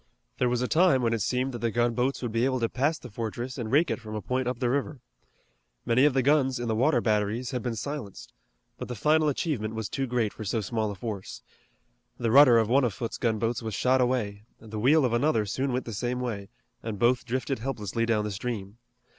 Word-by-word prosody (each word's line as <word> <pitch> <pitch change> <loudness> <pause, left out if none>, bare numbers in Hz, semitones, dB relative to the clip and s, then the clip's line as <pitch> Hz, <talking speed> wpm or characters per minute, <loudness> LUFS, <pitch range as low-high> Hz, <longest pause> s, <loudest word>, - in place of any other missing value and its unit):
There 125 - +2
was 125 0 0
a - - 0
time 155 -6 +4
when 115 -1 +2
it 115 - -1
seemed 130 +5 0
that 120 - -6
the 115 - 0
gunboats 120 +3 0
would 120 - -2
be 115 +1 0
able 130 0 +1
to 115 - +2
pass 145 +7 0
the 125 - -11
fortress 120 +4 -5
and 110 -2 -4
rake 155 +4 +3
it - - -2
from 110 -1 -7
a - - -2
point 130 0 -1
up 125 - -1
the 125 - 0
river. 140 +1 -2 0.9
Many 125 +3 +4
of 145 -3 +3
the 130 - +3
guns 135 -2 +2
in 120 - -3
the 110 - 0
water 125 +2 +2
batteries 110 +3 0
had 125 - -2
been 120 -1 -3
silenced, 125 -3 -6 0.5
but - - -5
the 125 - -5
final 155 +6 +3
achievement 120 -7 -2
was 110 -2 -4
too 135 -1 -2
great 120 -4 0
for - - -8
so 110 +3 -1
small 110 +1 -2
a 100 - -5
force. 100 -1 -6 0.7
The 115 -2 -1
rudder 130 -2 +8
of 110 -2 +3
one 130 +4 +3
of 120 -5 0
Foote's 115 -2 -5
gunboats 115 +1 0
was 110 -3 -4
shot 130 +1 +2
away, 115 -5 0 0.2
the 110 -1 -7
wheel 140 +5 +4
of 120 - 0
another 120 -3 +2
soon 130 +7 -2
went 125 +1 -2
the 115 - -6
same 125 +4 -2
way, 105 -6 -4 0.3
and 110 -2 -5
both 120 +3 +2
drifted 130 +1 -2
helplessly 115 -3 -2
down 110 -2 +1
the 105 - -3
stream. 105 0 -5
120 Hz, 235 wpm, -27 LUFS, 110-130 Hz, 0.9 s, rudder